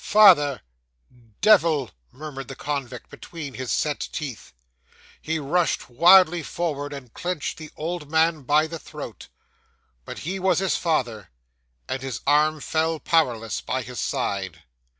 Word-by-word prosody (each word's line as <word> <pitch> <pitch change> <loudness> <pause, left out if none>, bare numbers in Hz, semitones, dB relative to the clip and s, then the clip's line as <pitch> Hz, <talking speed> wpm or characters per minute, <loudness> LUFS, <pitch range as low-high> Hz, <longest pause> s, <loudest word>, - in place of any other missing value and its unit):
'"Father 145 -10 +6 0.8
devil!" 165 - +4 0.2
murmured 135 -1 -8
the 135 - -8
convict 135 -4 -5
between 150 -5 -8
his 130 -1 -5
set 150 -2 -1
teeth. 140 -8 -6 0.7
He 160 +1 -2
rushed 155 -2 0
wildly 175 +4 +6
forward, 145 -2 -3
and 135 -5 -9
clenched 175 -4 -4
the 155 -1 -9
old 160 -1 -4
man 160 0 +2
by 150 +4 +3
the 165 +1 -7
throat - - -9 0.8
but - - -8
he 190 +4 -3
was 190 0 +2
his 190 -1 +1
father; 120 - -1 0.6
and 130 - -3
his 130 -4 -4
arm 150 +2 +3
fell 160 +1 0
powerless 120 - 0
by 130 0 -3
his 125 +1 -7
side. 95 -9 -3
150 Hz, 135 wpm, -24 LUFS, 130-165 Hz, 0.8 s, Father